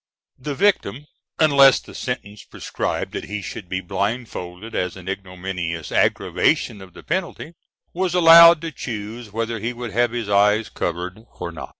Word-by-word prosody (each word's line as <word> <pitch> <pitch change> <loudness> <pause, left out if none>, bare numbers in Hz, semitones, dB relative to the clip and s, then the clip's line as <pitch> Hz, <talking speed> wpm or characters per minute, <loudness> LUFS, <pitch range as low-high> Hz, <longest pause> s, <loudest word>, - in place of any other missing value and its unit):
The 140 +2 -5
victim 150 - +1 0.3
unless 140 -4 +6
the - - -14
sentence 105 -5 -5
prescribed - - -4
that - - -5
he 105 0 -5
should 95 -2 -8
be 95 0 -2
blindfolded 100 0 -4
as 90 +1 -2
an 95 -1 -12
ignominious 90 -3 -5
aggravation 100 - +1
of 95 -2 -13
the - - -13
penalty 170 -1 -4 0.4
was 180 0 -1
allowed 170 -1 +8
to 165 -1 -5
choose 110 -3 -7
whether 115 +1 -3
he 115 +4 -3
would 120 -2 -7
have 120 +4 +2
his 120 -2 -4
eyes 105 +2 +3
covered 90 +3 -4 0.2
or - - -4
not. - - -8
110 Hz, 160 wpm, -21 LUFS, 95-135 Hz, 0.4 s, allowed